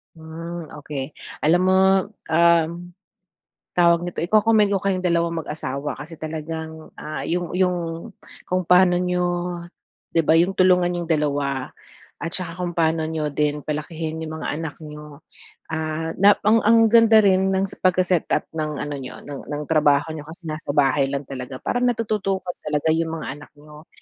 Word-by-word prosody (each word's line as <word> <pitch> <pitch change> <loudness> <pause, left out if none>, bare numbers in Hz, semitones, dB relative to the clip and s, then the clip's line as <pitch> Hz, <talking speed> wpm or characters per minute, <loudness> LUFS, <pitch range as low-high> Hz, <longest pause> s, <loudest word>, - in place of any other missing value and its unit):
Hmm, 165 +1 -8
okey. 145 -1 -5 0.3
Alam 170 +4 +4
mo, 190 - +4 0.5
um, 170 0 +4 1.0
tawag 170 0 +4
nito, 175 - -4
iko-commend 215 +3 +4
ko 200 - +2
kayong 190 -2 0
dalawang 170 -2 +1
mag-asawa 145 -2 -4
kasi 155 +3 -9
talagang, 160 0 -6
ah, 155 0 -5
yung 175 +1 -2
yung 180 -1 +2 0.7
kung 185 0 0
paano 180 0 +5
niyo, 180 0 0 0.9
'di 165 - +4
ba 160 +1 +4
yung 180 +3 +3
tulungan 180 -1 +3
niyong 175 -1 -4
2 145 -3 -1 0.4
at 165 - -5
saka 180 -3 -4
kung 180 -1 -3
paano 160 -1 +1
niyo 155 -1 -2
din 150 +1 -1
palakihin 155 +2 -4
yung 160 0 -6
mga 150 - -3
anak 160 0 -6
niyo. 150 -1 -10 0.5
Ah, 160 0 -2
na 200 +1 +7
ang 215 +2 +5
ang 225 0 +5
ganda 225 -2 +7
rin 190 -1 +3
ng 190 - +1
s - - -13
pagka-setup 185 -2 +2
ng 155 -1 -3
ano 145 +1 -4
niyo 130 -1 -9
ng 145 -1 -8
ng 145 0 -4
trabaho 150 -1 +3
niyo 155 -1 -8
kasi 170 +2 -12
nasa 155 -2 -5
bahay 140 -1 +3
lang 140 +1 -3
talaga 130 -1 -7
parang 245 0 +1
natututukan 195 -6 -1 0.2
talaga 150 +1 +1
yung 165 0 0
mga 160 - -6
anak 145 - -14
niyo, 150 +2 -15
165 Hz, 160 wpm, -22 LUFS, 150-180 Hz, 1.0 s, na